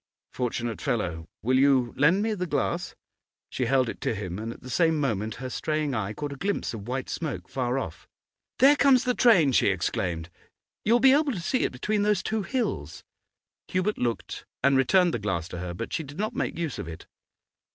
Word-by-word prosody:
'Fortunate 120 -2 -2
fellow! 90 - -2 0.2
Will 130 +3 +3
you 135 -3 +3
lend 165 +8 +4
me 220 0 0
the 180 -3 -3
glass?' 170 +4 -1 0.6
She 125 - -1
held 130 -1 +3
it - - -6
to - - -1
him, 95 -2 -5
and 115 +1 -4
at - - -11
the 130 - -9
same 160 0 +3
moment 110 -6 -1
her 130 - -6
straying 155 -1 -1
eye 110 -3 -2
caught 145 +5 -5
a - - -10
glimpse 200 -2 -2
of 110 -1 -7
white 130 +1 -3
smoke, 155 -4 -4
far 125 -1 -1
off. 85 -11 -5 0.5
'There 275 +3 +7
comes 270 -3 +5
the 250 - +1
train!' 195 - +5
she - - +3
exclaimed. 85 -2 -1 0.5
'You 220 - +3
will 240 - +5
be 265 0 +7
able 290 -1 +2
to 190 - -4
see 250 +10 0
it - - -1
between 205 +12 -1
these 205 -2 +2
two 220 0 -1
hills.' 250 +4 -3 0.6
Hubert 185 +3 -1
looked 120 -2 -3 0.2
and 140 0 +4
returned 175 +6 +4
the - - -1
glass 95 -6 -2
to 90 - -6
her, 90 0 -4
but - - -5
she - - 0
did 145 0 -10
not 215 +4 -2
make - - -2
use 165 -5 -3
of - - -5
it. 80 -1 -9
135 Hz, 210 wpm, -27 LUFS, 115-190 Hz, 0.6 s, There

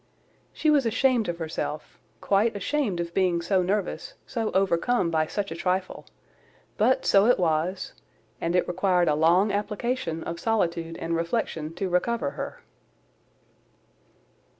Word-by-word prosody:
She 310 - +1
was 280 -5 +3
ashamed 245 -2 +2
of 170 - -3
herself, 160 -2 -5 0.2
quite 205 +3 +2
ashamed 205 -2 -1
of 170 0 -4
being 180 -3 +2
so 185 +2 +1
nervous, 205 - -2
so 225 -3 -2
overcome 190 +1 +2
by 155 -1 +1
such 200 +1 -3
a - - -4
trifle; 185 +2 -2 0.7
but 250 +5 +2
so 200 +2 +5
it 245 - +5
was, 175 +2 -1 0.5
and 170 +1 0
it 180 - +2
required 180 -1 +2
a 150 - +3
long 170 +7 +3
application 205 -4 -2
of 170 0 -5
solitude 170 -7 -1
and 165 0 -2
reflection 165 -2 -2
to 190 +2 -2
recover 235 +9 0
her. - - -7
185 Hz, 140 wpm, -26 LUFS, 170-220 Hz, 0.7 s, so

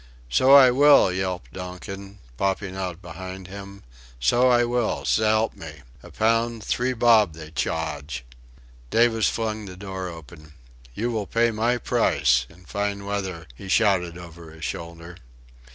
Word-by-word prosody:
"So 130 - +6
I 130 -3 +8
will," 140 -7 +6
yelped 95 -1 -4
Donkin, 95 +2 -8 0.2
popping 95 +4 -2
out 90 -1 -5
behind 95 +2 -8
him. 100 0 -10 0.4
"So 120 - +3
I 120 -1 +4
will 120 -1 -1
s'elp 110 0 +2
me... 75 -4 -10 0.2
a - - -13
pound... 115 0 0
three 125 +3 0
bob 110 -7 +4
they 80 -1 -10
chawrge." 75 -5 -3 0.7
Davis 115 -1 +3
flung 110 -2 -3
the 90 -2 -10
door 95 -1 -6
open. 80 -2 -12 0.4
"You 120 +3 -1
will 110 -4 -3
pay 115 +3 +2
my 115 +3 +1
price... 60 - +2
in 90 +1 -19
fine 100 0 -3
weather," 95 -5 -4
he 95 - -11
shouted 95 -5 +2
over 85 -1 -11
his 80 -2 -8
shoulder. 85 +1 -7
95 Hz, 145 wpm, -24 LUFS, 85-110 Hz, 0.7 s, I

